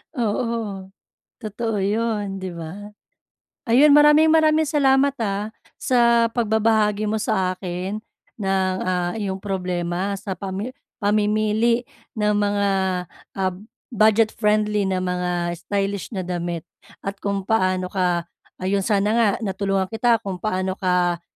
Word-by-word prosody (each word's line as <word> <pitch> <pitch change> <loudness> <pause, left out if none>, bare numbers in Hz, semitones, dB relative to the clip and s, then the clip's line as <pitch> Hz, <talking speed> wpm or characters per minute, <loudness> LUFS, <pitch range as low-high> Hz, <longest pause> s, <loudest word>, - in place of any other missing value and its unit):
Oo, 220 -4 -2 0.5
totoo 215 -1 -2
'yon, 205 -1 -1
'di 185 -2 -6
ba? 195 +6 -8 0.7
Ayun, 285 +5 +6
maraming 300 +1 +7
maraming 315 0 +4
salamat, 280 -2 +3
ah, 200 0 -1 0.3
sa 235 -3 +3
pagbabahagi 220 -2 +2
mo 210 - -1
sa 190 -5 0
akin 185 +3 -4 0.4
ng, 190 -1 +1
ah, 180 -1 -1
iyong 200 -4 -3
problema 185 0 -2
sa 195 -3 -5
pami 195 +7 -5 0.2
pamimili 215 +3 +1 0.3
ng 210 0 +2
mga, 205 -1 +1 0.7
ah, 185 -1 0 0.4
budget-friendly 215 -1 +2
na 185 - 0
mga 180 -1 -1
stylish 200 0 -2
na 190 - -3
damit 175 -1 -3 0.4
at 195 0 -4
kung 200 -1 -2
paano 185 -4 +1
ka 180 -3 0 0.3
Ayun, 195 +1 0
sana 205 +1 +1
nga 230 -2 +4
natulungan 195 -2 -1
kita 230 +2 +2
kung 185 -3 -6
paano 185 -3 -1
ka 180 -2 0
205 Hz, 120 wpm, -22 LUFS, 185-220 Hz, 0.7 s, maraming